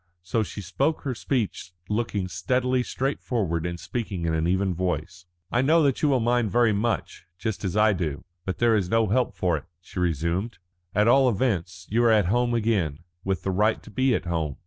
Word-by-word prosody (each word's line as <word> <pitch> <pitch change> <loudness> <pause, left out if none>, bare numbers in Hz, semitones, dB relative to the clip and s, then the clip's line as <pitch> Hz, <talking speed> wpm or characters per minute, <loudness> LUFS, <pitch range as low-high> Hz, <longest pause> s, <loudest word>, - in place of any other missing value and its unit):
So 110 +6 0
she 105 -1 -5
spoke 95 - 0
her 135 - -2
speech 115 -8 -2
looking 105 -3 -1
steadily 125 +8 0
straight 135 +3 -2
forward 90 -9 -1
and 85 0 -5
speaking 100 -8 -4
in 80 - 0
an 80 +1 +1
even 95 +1 +1
voice. 90 0 -3 0.2
"I 120 - +2
know 160 +4 +4
that 140 -3 +1
you 150 - +3
will 135 -2 +3
mind 120 -1 +1
very 120 0 +3
much, 105 -5 -2
just 100 +5 -3
as 95 +1 -1
I 105 0 +5
do. 80 -6 -3 0.2
But 95 - -3
there 120 -1 +4
is 95 -4 0
no 115 -1 +2
help 125 +4 +1
for 90 -3 +1
it," 75 - -9
she 90 +1 -8
resumed. 85 - -1 0.4
"At 105 +2 +4
all 130 +2 +5
events 95 -6 -1
you 120 +2 +3
are 120 - +5
at 105 -4 +4
home 120 -1 +2
again, 95 -10 0 0.2
with 95 -1 -2
the 95 - 0
right 105 +4 +1
to 110 - -13
be 130 +1 +2
at - - -3
home. 80 -5 -2
105 Hz, 210 wpm, -25 LUFS, 90-120 Hz, 0.4 s, I